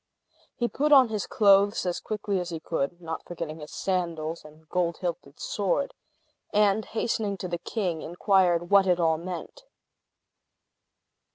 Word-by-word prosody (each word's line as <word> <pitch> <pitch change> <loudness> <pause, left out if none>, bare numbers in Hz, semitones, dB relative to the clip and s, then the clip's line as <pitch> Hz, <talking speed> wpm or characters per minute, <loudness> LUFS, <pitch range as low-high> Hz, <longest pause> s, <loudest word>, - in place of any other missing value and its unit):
He 240 - 0
put 295 +5 0
on 265 -4 +8
his 215 -2 -3
clothes 200 0 +4
as 175 -1 -1
quickly 205 -2 -2
as 180 -1 -4
he 165 -2 -4
could 160 +1 -2
(not 165 -2 -5
forgetting 165 -2 -6
his 150 0 -9
sandals 170 -4 -2
and 155 +1 -16
gold 170 0 0
hilted 170 -5 -5
sword), 205 +8 -1 0.6
and, 210 0 +3
hastening 220 -3 -1
to 185 - -5
the 175 -1 -3
king, 180 -6 -2
inquired 175 -1 +2
what 200 -1 +6
it 180 -1 +3
all 160 -2 +2
meant. 180 - -7
180 Hz, 150 wpm, -27 LUFS, 165-205 Hz, 0.6 s, on